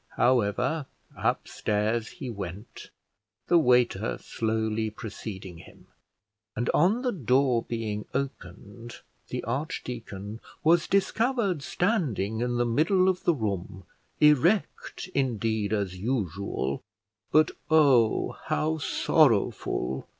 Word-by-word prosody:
However, 125 +5 +1 0.3
upstairs 110 +2 -1
he 145 -7 -8
went, 100 -2 -7 0.6
the 175 - +6
waiter 125 -6 +2
slowly 110 -1 -1
preceding 100 -4 -8
him; - - -16 0.7
and 120 +3 0
on 200 - +3
the 250 - +1
door 130 - +2
being 110 -3 -4
opened 115 -3 -6 0.3
the - - -4
archdeacon 115 -6 -5 0.2
was 165 +1 +4
discovered 200 - +1
standing 140 - -1
in 120 0 0
the 120 - +2
middle 165 - +3
of 185 -1 -2
the 170 - +4
room, 95 -5 -4 0.4
erect, 150 - +2
indeed, 110 -5 0
as 100 -4 -1
usual, 100 - -2 0.5
but 155 0 +4 0.2
oh! 140 -8 +4
how 160 +1 0
sorrowful! 115 - +1
120 Hz, 100 wpm, -27 LUFS, 105-155 Hz, 0.7 s, the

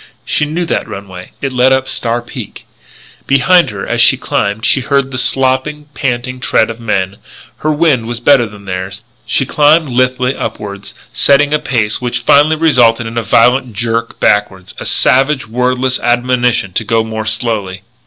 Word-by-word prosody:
She 150 - 0
knew 165 +4 -3
that - - -2
runway. 95 -2 -9
It 135 - -1
led 125 +1 +3
up 130 0 +1
Star 120 -1 -1
Peak. - - -9 0.6
Behind 170 +7 +4
her 105 -2 -6
as - - 0
she - - +5
climbed 100 +3 -2
she 135 - +2
heard 140 0 0
the 130 - -4
slopping, 135 +4 0
panting 130 -1 -3
tread 115 -3 +1
of 115 - -10
men; 100 -4 -2 0.4
her 155 - -1
wind 145 -7 +1
was 120 0 -4
better 120 -1 +4
than 105 -1 -14
theirs; 95 +2 -5 0.2
she 135 - +1
climbed 150 +2 +3
lithely 125 +1 0
upward, 100 -1 -6 0.2
setting 145 +1 +3
a 150 - +2
pace 120 -8 -1
which 125 0 -3
finally 150 +5 +4
resulted 125 -8 +3
in 115 +1 -7
a - - -1
violent 125 +2 +2
jerk 115 +2 -3
backward, 95 -3 0
a - - -6
savage, 135 0 +1
wordless 125 +2 -1
admonition 120 -4 0
to 110 - -1
go 115 +1 +1
more 110 -1 -5
slowly. 105 -4 -2
125 Hz, 170 wpm, -13 LUFS, 110-135 Hz, 0.6 s, she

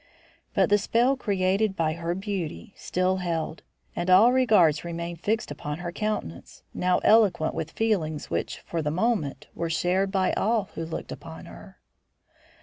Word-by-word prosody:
But - - +3
the 205 - +5
spell 240 +6 +2
created 195 -3 0
by 160 -3 0
her 170 +1 -3
beauty 195 +1 -5
still 185 +1 0
held, 165 -3 -3 0.3
and 175 - -2
all 200 +7 +7
regards 210 - +4
remained 170 0 -5
fixed 220 -5 -1
upon 150 0 -5
her 175 0 -5
countenance, 210 - -4
now 180 0 +2
eloquent 205 -8 +4
with 155 - -4
feelings 160 -8 -1
which - - -3
for 165 - -3
the 150 - -1
moment 180 - -1
were 170 - -3
shared 185 +4 +1
by 190 -2 +1
all 215 -2 0
who 165 0 -5
looked 165 - -6
upon - - -9
her. - - -13
185 Hz, 155 wpm, -26 LUFS, 165-210 Hz, 0.3 s, all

